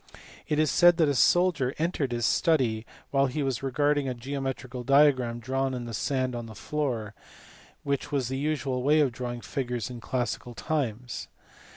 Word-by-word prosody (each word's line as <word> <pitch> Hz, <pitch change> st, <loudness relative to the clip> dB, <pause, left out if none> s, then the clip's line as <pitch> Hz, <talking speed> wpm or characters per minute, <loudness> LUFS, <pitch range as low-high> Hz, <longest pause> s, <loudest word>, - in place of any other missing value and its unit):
It 150 Hz, -, 0 dB
is 155 Hz, -1 st, +3 dB
said 175 Hz, -1 st, +6 dB
that 160 Hz, -3 st, +4 dB
a -, -, +2 dB
soldier 150 Hz, -1 st, +3 dB
entered 155 Hz, -5 st, -1 dB
his 120 Hz, -1 st, 0 dB
study 120 Hz, -10 st, +2 dB, 0.2 s
while 135 Hz, 0 st, +3 dB
he 145 Hz, +3 st, -2 dB
was 135 Hz, -3 st, -1 dB
regarding 145 Hz, +1 st, +1 dB
a 125 Hz, -, -3 dB
geometrical 130 Hz, 0 st, -4 dB
diagram 135 Hz, -3 st, +4 dB
drawn 130 Hz, +2 st, -1 dB
in 120 Hz, -2 st, -5 dB
sand 130 Hz, +2 st, -1 dB
on 120 Hz, -1 st, -5 dB
the 110 Hz, -, -10 dB
floor, 120 Hz, -7 st, -3 dB, 0.7 s
which 140 Hz, 0 st, -2 dB
was 135 Hz, -4 st, 0 dB
the 135 Hz, +1 st, -3 dB
usual 135 Hz, -3 st, -1 dB
way 150 Hz, +4 st, +4 dB
of 140 Hz, -4 st, +2 dB
drawing 120 Hz, 0 st, -5 dB
figures 125 Hz, -3 st, -3 dB
in 120 Hz, -2 st, -8 dB
classical 125 Hz, -1 st, -3 dB
times. 125 Hz, -6 st, -3 dB
130 Hz, 170 wpm, -27 LUFS, 120-145 Hz, 0.7 s, said